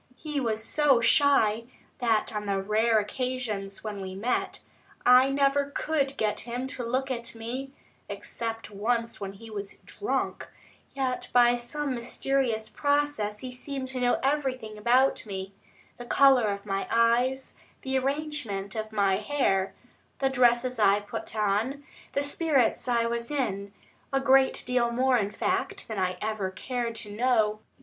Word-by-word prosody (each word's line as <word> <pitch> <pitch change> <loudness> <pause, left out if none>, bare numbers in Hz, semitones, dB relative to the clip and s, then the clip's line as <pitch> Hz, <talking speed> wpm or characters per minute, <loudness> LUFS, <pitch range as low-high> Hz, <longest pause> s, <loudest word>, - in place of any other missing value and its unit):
He 300 +1 -3
was 220 -4 -1
so 280 0 +4
shy, 230 -3 +3 0.3
that 225 -2 +1
on 210 0 -3
the 195 -1 +1
rare 220 +3 +2
occasions 215 -3 -3
when 210 -2 -5
we 190 0 -6
met, 225 +6 -1 0.4
I 250 +2 +7
never 275 +1 +2
could 280 -3 0
get 210 -1 0
him 245 +3 -4
to 250 - -4
look 260 +3 -1
at 235 -2 -4
me, 255 +4 -5 0.4
except 225 -2 -5
once 230 +2 -1
when 195 -1 -4
he 225 +3 -12
was 200 -2 -6
drunk; 405 - -3 0.5
yet 260 -2 -2
by 245 0 +6
some 270 +4 -3
mysterious 240 -1 -1
process 285 -5 0
he 255 -1 -6
seemed 265 +1 -5
to 260 -1 -4
know 245 0 +2
everything 265 -6 -1
about 245 +5 +3
me 190 -1 -5 0.4
the 245 - -8
colour 265 -3 +5
of 200 0 -3
my 195 -1 -2
eyes, 245 +3 +2 0.3
the 265 0 -2
arrangement 270 -8 -3
of 220 0 -4
my 200 -3 +2
hair, 205 -5 0 0.4
the 270 -1 +1
dresses 250 -1 +3
I 200 -1 +5
put 205 +1 -6
on, 215 +7 0 0.3
the 280 - +1
spirits 285 -6 +1
I 235 -1 +2
was 235 0 -2
in 205 -9 -2 0.4
a 270 - +2
great 270 0 +4
deal 245 -1 +2
more, 255 +1 +3
in 200 -2 -1
fact, 380 - -2
than 220 -3 -4
I 185 -1 0
ever 215 -3 -1
cared 235 +4 -3
to 215 -2 -6
know. 215 -2 +2
240 Hz, 155 wpm, -27 LUFS, 215-265 Hz, 0.5 s, I